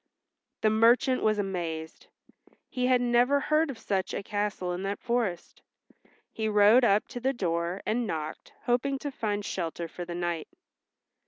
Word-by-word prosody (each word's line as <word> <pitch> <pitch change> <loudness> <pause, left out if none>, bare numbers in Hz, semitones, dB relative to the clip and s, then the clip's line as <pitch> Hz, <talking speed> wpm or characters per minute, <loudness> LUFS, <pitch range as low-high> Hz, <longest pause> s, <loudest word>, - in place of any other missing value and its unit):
The 215 - +3
merchant 235 +4 +4
was 215 -1 +2
amazed. 170 -5 -4 0.6
He 250 -1 -1
had 255 -1 +4
never 245 +3 +3
heard 305 +2 +2
of 265 - -5
such 195 -4 -2
a - - -3
castle 205 -3 -2
in 175 - -4
that 195 +1 -2
forest. 235 -8 -2 0.7
He 220 -1 -2
rode 210 +4 +6
up 210 -2 +3
to 245 - -6
the 265 +2 0
door 170 -3 -2
and 230 +1 0
knocked, 155 -3 -5
hoping 255 +3 +1
to 285 +1 -5
find 205 -5 -2
shelter 170 -1 -3
for 175 - -7
the 175 0 -6
night. 175 -2 -2
210 Hz, 160 wpm, -28 LUFS, 180-245 Hz, 0.7 s, rode